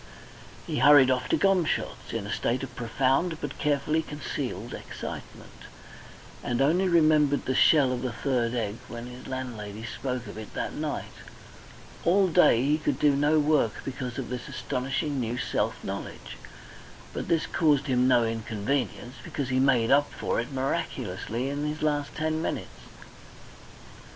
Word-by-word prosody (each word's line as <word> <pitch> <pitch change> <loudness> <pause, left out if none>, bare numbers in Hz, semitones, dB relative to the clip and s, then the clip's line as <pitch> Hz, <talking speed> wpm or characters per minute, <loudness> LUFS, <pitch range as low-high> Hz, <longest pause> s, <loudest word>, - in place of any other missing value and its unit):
He - - -2
hurried 135 -1 +7
off 125 -1 -1
to - - +3
Gomshott's 190 -5 0
in 115 -3 -3
a 105 - -3
state 125 +3 -1
of 125 -2 -7
profound 135 +8 0
but 145 -1 -6
carefully 150 +2 +1
concealed 150 -2 -5
excitement, - - -8 0.9
and 120 0 -1
only 170 +8 +3
remembered 155 -4 +4
the 130 - 0
shell 140 0 +5
of 125 -1 -2
the 130 -1 -2
third 120 -1 -1
egg 110 -2 -2
when 120 0 -7
his 125 +1 -10
landlady 115 -5 -5
spoke 125 0 -4
of 105 +1 -8
it 110 - -10
that - - -3
night. - - -4 0.9
All 190 +3 +4
day 160 -8 +5
he 150 +2 +2
could 155 - -1
do 145 -2 +3
no 145 +2 +3
work 145 -7 +2
because 130 -2 -5
of 135 - -4
this 125 -1 -5
astonishing 135 +3 -2
new 120 0 -2
self - - -1
knowledge, - - -6 0.8
but - - -4
this 165 -1 +2
caused 150 -4 +2
him 125 -2 +2
no 120 -2 +4
inconvenience, 115 +3 -2
because 140 -3 -4
he 130 0 +1
made 125 -4 +3
up 145 +1 +4
for - - -2
it 120 +4 -4
miraculously 130 -2 -2
in 145 +1 -3
his 150 +1 -3
last 145 -2 0
ten 155 0 -1
minutes. - - -5
135 Hz, 155 wpm, -27 LUFS, 120-150 Hz, 0.9 s, hurried